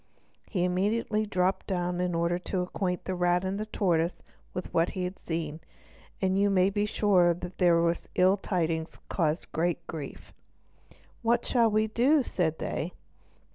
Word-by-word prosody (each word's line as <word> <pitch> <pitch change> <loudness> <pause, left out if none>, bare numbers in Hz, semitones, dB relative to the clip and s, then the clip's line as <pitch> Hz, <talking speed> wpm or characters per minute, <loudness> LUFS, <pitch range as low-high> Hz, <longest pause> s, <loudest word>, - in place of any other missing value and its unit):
He 180 -5 0
immediately 210 +4 0
dropped 185 -1 0
down 180 -2 -1
in 180 -1 0
order 170 +1 +1
to 180 0 -2
acquaint 180 -1 -3
the 185 - -2
rat 180 0 +2
and 195 +3 -2
tortoise 170 -3 +1 0.3
with 180 - -6
what 165 +1 +3
he 185 - -1
had 180 +1 -4
seen; 160 -2 -4 0.6
and 190 0 +1
you 200 0 +4
may 190 0 +3
be 205 +1 0
sure 185 -5 +3
that 180 +1 -8
these 170 -1 +3
ill 185 +2 +5
tidings 165 -4 -2
caused 160 -2 -1
great 170 +1 -1
grief. 155 -5 -8 0.9
"What 235 0 +2
shall 235 -3 +3
we 215 0 +2
do?" 255 +7 +3
said 160 -8 -1
they. 170 +5 -3
180 Hz, 155 wpm, -28 LUFS, 170-200 Hz, 0.9 s, ill